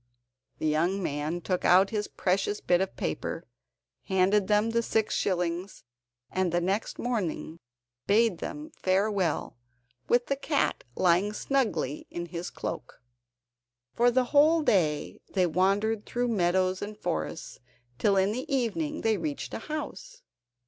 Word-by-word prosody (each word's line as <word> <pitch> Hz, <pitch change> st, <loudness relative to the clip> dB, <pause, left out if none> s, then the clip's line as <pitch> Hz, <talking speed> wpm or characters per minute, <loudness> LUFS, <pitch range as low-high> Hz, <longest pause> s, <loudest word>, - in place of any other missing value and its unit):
The -, -, -4 dB
young 170 Hz, +6 st, +1 dB
man 150 Hz, +3 st, -2 dB
took 180 Hz, +1 st, -1 dB
out 190 Hz, +2 st, +5 dB
his 210 Hz, -2 st, -1 dB
precious 195 Hz, +2 st, 0 dB
bit 175 Hz, 0 st, +2 dB
of 190 Hz, -, -2 dB
paper, 80 Hz, -, -3 dB, 0.6 s
handed 190 Hz, +1 st, +2 dB
them 210 Hz, +2 st, +3 dB
the 235 Hz, 0 st, +2 dB
six 220 Hz, -1 st, 0 dB
shillings, 180 Hz, 0 st, -1 dB, 0.5 s
and 185 Hz, -2 st, 0 dB
the 175 Hz, -, +2 dB
next 195 Hz, +5 st, -1 dB
morning 185 Hz, -8 st, -3 dB, 0.5 s
bade 215 Hz, -2 st, +3 dB
them 300 Hz, +2 st, -6 dB
farewell, 190 Hz, -, 0 dB, 0.5 s
with 240 Hz, 0 st, +3 dB
the 275 Hz, -, 0 dB
cat 280 Hz, +1 st, 0 dB
lying 185 Hz, +4 st, +3 dB
snugly 210 Hz, -, -1 dB
in 175 Hz, 0 st, -5 dB
his 170 Hz, +1 st, -5 dB
cloak. -, -, -6 dB, 0.9 s
For 240 Hz, +1 st, +4 dB
the 255 Hz, +1 st, +3 dB
whole 310 Hz, +3 st, +5 dB
day 155 Hz, -, +1 dB
they 185 Hz, -2 st, +4 dB
wandered 200 Hz, +5 st, +1 dB
through 245 Hz, 0 st, -1 dB
meadows 185 Hz, -2 st, +1 dB
and 210 Hz, +1 st, -6 dB
forests, 80 Hz, -, -4 dB, 0.4 s
till 200 Hz, -2 st, +3 dB
in 190 Hz, +1 st, +3 dB
the 255 Hz, +5 st, -5 dB
evening 275 Hz, +4 st, -1 dB
they 220 Hz, -1 st, +2 dB
reached 295 Hz, -3 st, -4 dB
a -, -, -3 dB
house. -, -, -6 dB
195 Hz, 140 wpm, -28 LUFS, 175-235 Hz, 0.9 s, out